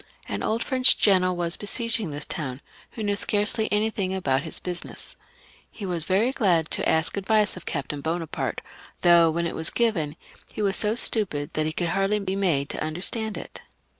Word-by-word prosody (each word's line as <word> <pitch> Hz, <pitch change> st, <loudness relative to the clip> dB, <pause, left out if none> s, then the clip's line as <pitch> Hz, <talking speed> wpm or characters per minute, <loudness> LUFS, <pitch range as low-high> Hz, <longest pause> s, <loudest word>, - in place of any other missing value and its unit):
An -, -, -4 dB
old 225 Hz, +1 st, 0 dB
French 260 Hz, -1 st, +5 dB
general 185 Hz, -3 st, +3 dB
was 170 Hz, -1 st, -1 dB
besieging 230 Hz, -1 st, -1 dB
this 145 Hz, 0 st, -2 dB
town, 135 Hz, -4 st, -5 dB, 0.3 s
who 220 Hz, -, -5 dB
knew 205 Hz, -1 st, 0 dB
scarcely 210 Hz, +2 st, +1 dB
anything 210 Hz, -3 st, 0 dB
about 135 Hz, -8 st, 0 dB
his 160 Hz, -1 st, -5 dB
business. 180 Hz, -1 st, -7 dB, 0.5 s
He 205 Hz, -, -8 dB
was 175 Hz, -4 st, 0 dB
very 205 Hz, +7 st, +2 dB
glad 175 Hz, -, +1 dB
to -, -, +1 dB
ask 160 Hz, +4 st, +2 dB
advice 210 Hz, +1 st, +2 dB
of -, -, -11 dB
Captain 145 Hz, -1 st, -4 dB
Bonaparte, 165 Hz, +1 st, -3 dB, 0.4 s
though, 170 Hz, -1 st, +6 dB
when 170 Hz, +2 st, -1 dB
it 170 Hz, -, -2 dB
was 160 Hz, 0 st, +1 dB
given, 175 Hz, -11 st, 0 dB, 0.4 s
he 215 Hz, -, -4 dB
was 195 Hz, -1 st, +2 dB
so 215 Hz, +1 st, +1 dB
stupid 185 Hz, -12 st, +1 dB
that 155 Hz, 0 st, 0 dB
he -, -, 0 dB
could 170 Hz, +1 st, -2 dB
hardly 195 Hz, +3 st, +1 dB
be 195 Hz, -2 st, -3 dB
made 165 Hz, -8 st, +1 dB
to -, -, -3 dB
understand 195 Hz, +7 st, -3 dB
it. -, -, -8 dB
185 Hz, 185 wpm, -25 LUFS, 160-210 Hz, 0.5 s, though